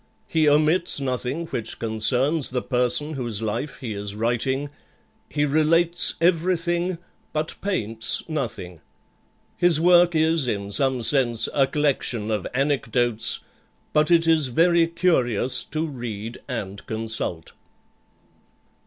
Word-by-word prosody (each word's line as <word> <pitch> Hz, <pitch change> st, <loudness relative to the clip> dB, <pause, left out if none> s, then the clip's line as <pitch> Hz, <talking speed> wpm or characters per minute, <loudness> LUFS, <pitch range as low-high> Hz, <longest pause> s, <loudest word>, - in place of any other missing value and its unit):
He 155 Hz, -2 st, +2 dB
omits 155 Hz, +3 st, +3 dB
nothing 130 Hz, +4 st, -3 dB
which 120 Hz, -8 st, -5 dB
concerns 125 Hz, +7 st, +1 dB
the 125 Hz, -1 st, -3 dB
person 125 Hz, +5 st, 0 dB
whose 120 Hz, -7 st, -1 dB
life 115 Hz, +6 st, -4 dB
he 115 Hz, -4 st, -4 dB
is 100 Hz, 0 st, -3 dB
writing; 130 Hz, +5 st, -1 dB, 0.6 s
he 150 Hz, 0 st, 0 dB
relates 165 Hz, +4 st, +3 dB
everything, 175 Hz, +1 st, +1 dB, 0.4 s
but 155 Hz, +1 st, -1 dB
paints 115 Hz, -, -1 dB
nothing. 105 Hz, -, -5 dB, 0.8 s
His 175 Hz, -3 st, +3 dB
work 175 Hz, 0 st, +5 dB
is, 160 Hz, -3 st, +2 dB
in 100 Hz, -3 st, -3 dB
some 130 Hz, +1 st, +1 dB
sense, 120 Hz, -3 st, +2 dB
a 135 Hz, -2 st, +3 dB
collection 130 Hz, -7 st, -1 dB
of 105 Hz, -3 st, -2 dB
anecdotes, 125 Hz, -4 st, +1 dB, 0.5 s
but 150 Hz, 0 st, +2 dB
it 170 Hz, -1 st, +4 dB
is 160 Hz, -4 st, +3 dB
very 165 Hz, +6 st, +3 dB
curious 130 Hz, -, +1 dB
to 155 Hz, +2 st, -3 dB
read 120 Hz, -6 st, -6 dB
and 100 Hz, -6 st, -6 dB
consult." 110 Hz, -7 st, -3 dB
135 Hz, 120 wpm, -23 LUFS, 115-160 Hz, 0.8 s, work